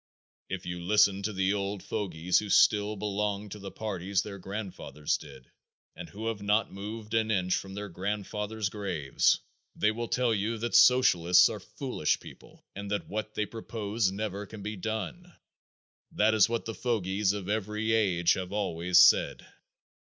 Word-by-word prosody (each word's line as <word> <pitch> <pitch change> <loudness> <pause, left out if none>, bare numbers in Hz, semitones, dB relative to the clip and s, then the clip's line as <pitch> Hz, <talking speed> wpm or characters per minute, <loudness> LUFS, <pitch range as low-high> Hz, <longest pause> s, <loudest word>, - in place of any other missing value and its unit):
If 95 0 -5
you 90 0 -5
listen 100 0 +4
to 105 +2 -2
the 95 0 +1
old 100 -1 -3
fogies 90 -3 0
who 105 - -6
still 105 +1 +4
belong 105 0 -2
to 105 - -8
the 100 0 -7
parties 95 -2 -2
their 100 -2 -8
grandfathers 95 -7 -4
did 70 -4 -14 0.4
and - - -8
who 110 +3 -7
have 115 -3 -2
not 105 +1 +1
moved 105 +2 -7
an 110 -1 +2
inch 90 -4 +1
from 95 0 -5
their 105 0 -5
grandfathers' 105 +3 -3
graves, 95 -9 +1 0.4
they 105 - +2
will 120 +2 -4
tell 125 -1 +1
you 110 +2 -1
that 120 +2 -3
socialists 90 -9 +6
are 110 - -5
foolish 125 - -2
people - - -15
and 100 0 -6
that 105 0 -3
what 110 +1 -4
they 105 - 0
propose 110 -2 -2
never 100 0 -4
can 105 -1 -10
be 105 +1 -4
done. 110 - -5 0.8
That 110 +1 +3
is 110 0 +5
what 115 -1 -2
the 115 - -4
fogies 105 -4 0
of 100 -3 -5
every 105 +1 -1
age 90 -6 +3
have 95 0 -4
always 90 -3 +2
said. 90 - +5
105 Hz, 170 wpm, -29 LUFS, 95-110 Hz, 0.8 s, socialists